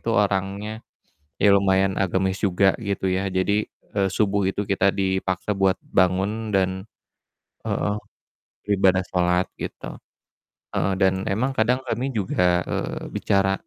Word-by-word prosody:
itu - - -7
orangnya 100 +2 -1 0.6
ya 100 - +6
lumayan 95 -1 +3
agamis 95 0 0
juga 95 +1 +3
gitu 100 -2 -2
ya. 95 +1 0
Jadi, 100 +3 +1 0.3
eee, 95 -1 +2
subuh 100 -1 +1
itu 100 - -2
kita 100 0 +3
dipaksa 95 0 -1
buat 95 -1 +2
bangun 100 +4 0
dan, 95 -1 +3 1.0
eee, 105 - -1 0.7
beribadah 95 -2 +3
salat, 90 0 +2
gitu. - - -6 0.8
Eee, 95 - +1
dan 95 0 +2
emang 115 +8 0
kadang 125 +4 +2
kami 125 +2 -2
juga, 90 -3 +2
eee, - - -3
bicara 95 0 +1
95 Hz, 125 wpm, -23 LUFS, 95-105 Hz, 1.0 s, ya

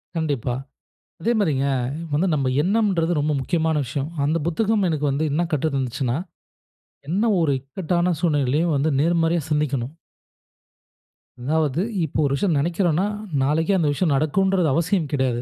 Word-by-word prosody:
கண்டிப்பா. 140 -7 -1 0.7
அதே 235 - +1
மாரிங்க, 140 -7 +1 0.5
வந்து 155 +6 +2
நம்ப 135 -3 0
எண்ணம்ன்றது 190 -4 +1
ரொம்ப 150 +1 0
முக்கியமான 160 +2 0
விஷயம். 140 +4 -3
அந்த 155 +3 +1
புத்தகம் 205 +4 +1
எனக்கு 150 -3 -1
வந்து 140 +3 0
என்ன 160 +4 +1
கற்று 155 +2 +1
தந்துச்சுனா, 130 -1 -1 0.9
என்ன 195 +8 +1 0.2
ஒரு 150 -4 +2
இக்கட்டான 175 +5 -1
சூழ்நிலையிலும் 150 0 +1
வந்து 150 +3 +1
நேர்மறையா 165 +1 +2
சிந்திக்கணும். 145 -1 -1 1.5
அதாவது 155 +2 +1 0.2
இப்போ 155 -1 -3
ஒரு 140 - 0
விஷயம் 175 -1 +1
நினைக்கிறோன்னா, 175 +2 +1 0.4
நாளைக்கே 160 +8 +2
அந்த 160 -4 +1
விஷயம் 160 0 +1
நடக்கும்ன்றது 180 +4 +2
அவசியம் 170 -1 0
கிடையாது. 130 -4 0
160 Hz, 130 wpm, -22 LUFS, 140-175 Hz, 1.5 s, வந்து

